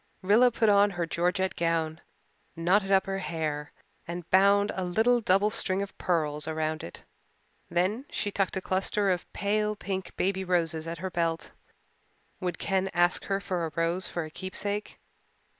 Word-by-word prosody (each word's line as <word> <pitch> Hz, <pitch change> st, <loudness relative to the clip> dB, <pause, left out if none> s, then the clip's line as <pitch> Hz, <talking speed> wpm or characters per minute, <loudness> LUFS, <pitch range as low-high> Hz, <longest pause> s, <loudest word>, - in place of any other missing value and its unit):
Rilla 220 Hz, +6 st, +6 dB
put 225 Hz, -1 st, +1 dB
on 205 Hz, 0 st, +5 dB
her 170 Hz, -, 0 dB
georgette 180 Hz, +3 st, 0 dB
gown, 165 Hz, -1 st, -1 dB, 0.5 s
knotted 190 Hz, +4 st, +2 dB
up 190 Hz, -1 st, +4 dB
her 195 Hz, 0 st, -2 dB
hair 155 Hz, -4 st, -3 dB, 0.4 s
and 175 Hz, 0 st, -6 dB
bound 200 Hz, +2 st, +5 dB
a 190 Hz, -, -3 dB
little 225 Hz, +7 st, +2 dB
double 205 Hz, +1 st, +3 dB
string 190 Hz, -2 st, -1 dB
of 200 Hz, -, -9 dB
pearls 150 Hz, -4 st, 0 dB
around 155 Hz, 0 st, -2 dB
it. 85 Hz, -, -9 dB, 0.7 s
Then 185 Hz, +9 st, 0 dB
she 205 Hz, -, -2 dB
tucked 195 Hz, -1 st, -1 dB
a -, -, -2 dB
cluster 195 Hz, +2 st, +1 dB
of 180 Hz, -1 st, -3 dB
pale 210 Hz, +1 st, 0 dB
pink 190 Hz, -3 st, -5 dB
baby 190 Hz, 0 st, 0 dB
roses 165 Hz, -3 st, 0 dB
at 165 Hz, +1 st, -4 dB
her 185 Hz, +3 st, -4 dB
belt. 165 Hz, -2 st, -1 dB, 0.9 s
Would 180 Hz, -3 st, -3 dB
Ken 190 Hz, 0 st, 0 dB
ask 175 Hz, 0 st, +3 dB
her 195 Hz, 0 st, 0 dB
for 180 Hz, -3 st, -2 dB
a -, -, -9 dB
rose 170 Hz, +3 st, 0 dB
for 170 Hz, -, -3 dB
a 155 Hz, -, -10 dB
keepsake? 200 Hz, +4 st, -4 dB
185 Hz, 165 wpm, -28 LUFS, 170-200 Hz, 0.9 s, Rilla